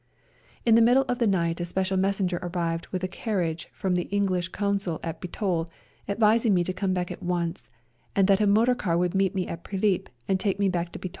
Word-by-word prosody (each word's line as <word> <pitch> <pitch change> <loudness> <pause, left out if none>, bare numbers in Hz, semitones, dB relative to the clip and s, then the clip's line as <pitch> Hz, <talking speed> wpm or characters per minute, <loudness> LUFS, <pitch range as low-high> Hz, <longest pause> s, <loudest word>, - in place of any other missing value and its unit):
In 230 - +5
the 230 - +7
middle 250 +4 +5
of 245 0 -1
the 235 - +3
night 170 -4 +1
a 175 - -1
special 190 +2 -1
messenger 190 -2 0
arrived 170 -2 -2
with 185 -1 -4
a - - +1
carriage 175 -5 -2
from 190 -2 -2
the 175 -1 0
English 190 -3 0
Consul 200 -4 -1
at 165 -1 -5
Bitol, 175 -2 -2 0.4
advising 220 +1 +3
me 175 - +3
to 185 - -3
come 185 +1 -1
back 180 -1 -2
at - - -8
once, 175 -1 -2 0.5
and 195 -1 +4
that 200 +1 +4
a 210 - +3
motor 225 +5 +4
car 175 -8 -1
would 175 0 +1
meet 195 -1 +1
me 185 -1 0
in 170 - -5
Prilip, 195 +2 -1 0.2
and 190 -1 +1
take 195 -1 0
me 200 -1 +2
back 175 -1 -2
to - - -5
Bitol. 185 - -5
185 Hz, 225 wpm, -26 LUFS, 175-200 Hz, 0.5 s, the